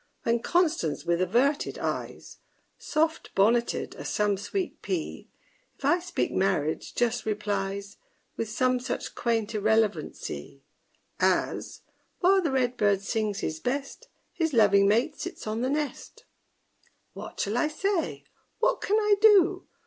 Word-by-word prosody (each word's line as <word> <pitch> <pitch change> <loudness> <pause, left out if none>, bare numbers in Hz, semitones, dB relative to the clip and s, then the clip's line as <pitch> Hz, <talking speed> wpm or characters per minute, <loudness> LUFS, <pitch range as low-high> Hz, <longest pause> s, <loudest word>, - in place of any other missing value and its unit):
When 235 0 +2
CONSTANCE, 305 - 0
with 170 +1 +1
averted 245 +10 +1
eyes, - - -5 0.4
Soft 320 +1 0
bonneted 235 +4 +2
as - - -6
some 210 -1 +1
sweet 360 - -4
pea, 350 -4 -4 0.5
If - - -7
I 350 - +4
speak 355 0 -2
marriage, 180 -5 0
just 240 -1 +1
replies 200 -1 -3 0.4
With 225 - -3
some 255 +3 +1
such 250 - -4
quaint 230 -2 -1
irrelevancy, 205 - -1 0.6
As, - - 0 0.4
While 385 +1 +4
the 330 - 0
red 250 -2 0
bird 205 -2 +2
sings 210 -1 -1
his 155 0 -3
best, 275 - -4 0.3
His 325 -3 -1
loving 200 -4 +5
mate 240 +9 +1
sits 360 0 -6
on 220 +1 -2
the 255 - 0
nest. 295 0 -4 0.9
What - - -9
shall 205 +3 -1
I 300 - +2
say? 370 +3 -2 0.3
what - - +1
can 420 - +2
I 420 -1 +3
do? 390 -4 +5
235 Hz, 135 wpm, -27 LUFS, 205-320 Hz, 0.9 s, loving